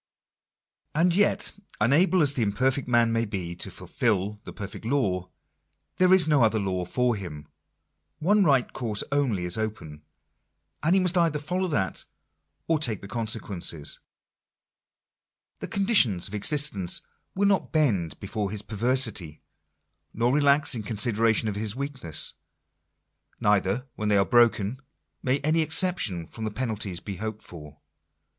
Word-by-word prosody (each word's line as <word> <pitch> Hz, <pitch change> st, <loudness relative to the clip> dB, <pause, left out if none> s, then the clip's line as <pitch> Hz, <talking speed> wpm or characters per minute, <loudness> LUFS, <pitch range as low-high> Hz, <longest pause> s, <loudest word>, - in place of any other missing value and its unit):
And 170 Hz, +3 st, +3 dB
yet, 205 Hz, +3 st, +2 dB, 0.3 s
unable 160 Hz, -, +3 dB
as 145 Hz, -1 st, +3 dB
the 130 Hz, -, -2 dB
imperfect 125 Hz, +6 st, 0 dB
man 120 Hz, -2 st, +3 dB
may 115 Hz, 0 st, +1 dB
be 95 Hz, -6 st, -4 dB
to -, -, -4 dB
fulfil 105 Hz, -2 st, -2 dB
the -, -, -7 dB
perfect 100 Hz, 0 st, -8 dB
law, 100 Hz, -8 st, -1 dB, 0.7 s
there 185 Hz, 0 st, +4 dB
is 185 Hz, -4 st, +5 dB
no 150 Hz, -4 st, +3 dB
other 110 Hz, -1 st, +3 dB
law 95 Hz, -3 st, -2 dB
for 125 Hz, +5 st, 0 dB
him. 75 Hz, -7 st, -8 dB, 0.7 s
One 205 Hz, +5 st, +3 dB
right 135 Hz, -7 st, +2 dB
course 110 Hz, -5 st, -1 dB
only 125 Hz, -11 st, 0 dB
is 90 Hz, +4 st, -1 dB
open; 80 Hz, -9 st, -5 dB, 0.8 s
and 165 Hz, +4 st, +3 dB
he -, -, +5 dB
must 180 Hz, -1 st, +1 dB
either 165 Hz, -3 st, +2 dB
follow 180 Hz, +6 st, -2 dB
that 95 Hz, -, -1 dB, 0.6 s
or 160 Hz, -2 st, +2 dB
take 115 Hz, -9 st, +1 dB
the 100 Hz, -, -9 dB
con 115 Hz, +1 st, -3 dB
sequences. 90 Hz, -8 st, -2 dB, 1.6 s
The -, -, -5 dB
conditions 195 Hz, -, +3 dB
of 100 Hz, -, -13 dB
existence 105 Hz, -, 0 dB, 0.3 s
will 200 Hz, +1 st, +2 dB
not 195 Hz, -2 st, +1 dB
bend 110 Hz, -, 0 dB
before 100 Hz, 0 st, -3 dB
his 105 Hz, 0 st, -5 dB
perversity; 110 Hz, -, 0 dB, 0.7 s
nor 120 Hz, +3 st, +1 dB
relax 145 Hz, +1 st, +3 dB
in 115 Hz, -, -2 dB
consideration 110 Hz, +1 st, +1 dB
of 105 Hz, -, -1 dB
his 105 Hz, +1 st, -2 dB
weakness. 135 Hz, -, 0 dB, 1.1 s
Neither, 105 Hz, +4 st, +1 dB
when 105 Hz, -1 st, -1 dB
they 105 Hz, -, +4 dB
are 100 Hz, -, +3 dB
broken, 120 Hz, 0 st, +2 dB, 0.4 s
may 130 Hz, +1 st, +1 dB
any 155 Hz, +3 st, +2 dB
exception 155 Hz, -, +2 dB
from 110 Hz, +5 st, -6 dB
penalties 110 Hz, -7 st, -3 dB
be 100 Hz, 0 st, -7 dB
hoped 110 Hz, +1 st, -5 dB
for. 75 Hz, -3 st, -11 dB
115 Hz, 145 wpm, -26 LUFS, 100-145 Hz, 1.6 s, is